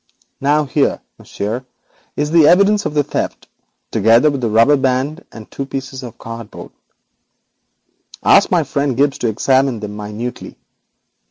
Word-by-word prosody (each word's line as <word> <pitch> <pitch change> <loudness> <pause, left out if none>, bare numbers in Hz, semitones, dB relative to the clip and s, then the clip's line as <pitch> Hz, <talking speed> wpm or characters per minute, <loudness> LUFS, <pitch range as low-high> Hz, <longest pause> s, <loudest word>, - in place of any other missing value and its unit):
Now 145 +2 +2
here, 140 +1 0 0.2
Monsieur, 110 +5 -5 0.5
is 150 +1 -2
the 160 -3 +6
evidence 200 +4 +4
of 150 - -7
the 145 - +3
theft, - - -4 0.4
together 115 +8 +4
with 140 -2 -4
the 115 - 0
rubber 115 +7 +4
band 135 +5 -1
and 110 -2 -11
two 140 - -4
pieces 135 -1 -6
of 120 -3 -10
cardboard. 115 -1 -9 1.5
Ask - - +5
my - - +2
friend 140 -3 -2
Gibbes 140 +1 +1
to 120 - -1
examine 130 +2 +1
them 105 -1 -7
minutely. 105 +4 -7
130 Hz, 145 wpm, -17 LUFS, 115-145 Hz, 1.5 s, the